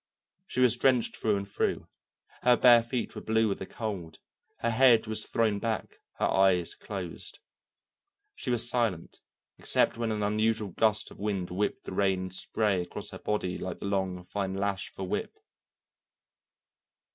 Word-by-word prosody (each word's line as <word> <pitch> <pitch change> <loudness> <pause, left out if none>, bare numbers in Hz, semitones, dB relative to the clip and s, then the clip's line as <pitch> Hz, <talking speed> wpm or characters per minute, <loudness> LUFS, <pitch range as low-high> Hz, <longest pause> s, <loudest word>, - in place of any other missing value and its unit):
She 130 - -1
was 125 -1 +5
drenched 125 -2 +2
through 110 -2 +1
and 100 0 -3
through, 100 - -1 0.5
her 125 -1 +5
bare 120 -1 +7
feet 120 +1 -3
were - - -7
blue 110 0 +2
with 100 - -2
the 95 - -6
cold, 95 -9 -5 0.4
her 115 - +1
head 120 -1 +5
was 110 0 -3
thrown 110 -3 +1
back, 110 +1 -3
her - - -1
eyes 95 -3 +3
closed. 95 -5 -7 1.0
She 130 - -5
was 120 -1 +4
silent 115 -9 0 0.4
except - - +1
when 115 -1 -1
an 105 -1 -1
unusual 110 0 +1
gust 110 +3 +1
of - - -14
wind 100 -4 -2
whipped 100 +3 -2
the - - -7
rain 95 -1 +1
and 95 -1 -5
spray 100 0 0
across 90 - -4
her - - -8
body 100 -4 -2
like 90 -1 -5
the - - -7
long, 95 -2 -1
fine 95 +1 -3
lash 100 0 -2
of - - -26
a 95 - -4
whip. 90 - -3
105 Hz, 170 wpm, -29 LUFS, 95-115 Hz, 1.0 s, bare